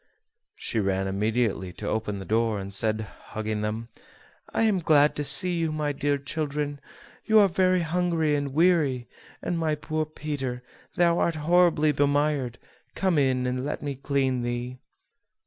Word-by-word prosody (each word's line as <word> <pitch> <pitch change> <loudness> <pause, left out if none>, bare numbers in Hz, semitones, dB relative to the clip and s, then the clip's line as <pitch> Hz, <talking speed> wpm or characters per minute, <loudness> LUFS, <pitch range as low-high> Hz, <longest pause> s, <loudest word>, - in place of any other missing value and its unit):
She - - -3
ran 95 -1 0
immediately 105 -1 -1
to - - -7
open 110 -2 -2
the 95 - -7
door, 110 -1 +1
and 100 0 -6
said, 110 +2 +1
hugging 110 +1 -5
them: 110 +2 -3 0.6
"I - - +1
am 210 -4 +3
glad 150 -3 +4
to 145 - -1
see 145 +6 +4
you, 165 -2 0
my 150 -1 -1
dear 145 0 0
children; 145 0 -3 0.5
you 220 -1 +4
are 205 -2 +7
very 185 0 +2
hungry 165 -2 0
and 145 -1 -1
weary; 150 -6 +2 0.4
and 170 - -1
my 155 -2 +1
poor 155 +1 -3
Peter, 140 -5 -4 0.3
thou 170 -1 +3
art 170 - +1
horribly 160 -1 +3
bemired; 145 -3 +1 0.4
come 185 -5 +2
in 130 -2 +1
and 125 0 -2
let 145 - -4
me 140 -1 -3
clean 135 -2 0
thee." 120 +1 -4
145 Hz, 160 wpm, -26 LUFS, 120-160 Hz, 0.6 s, are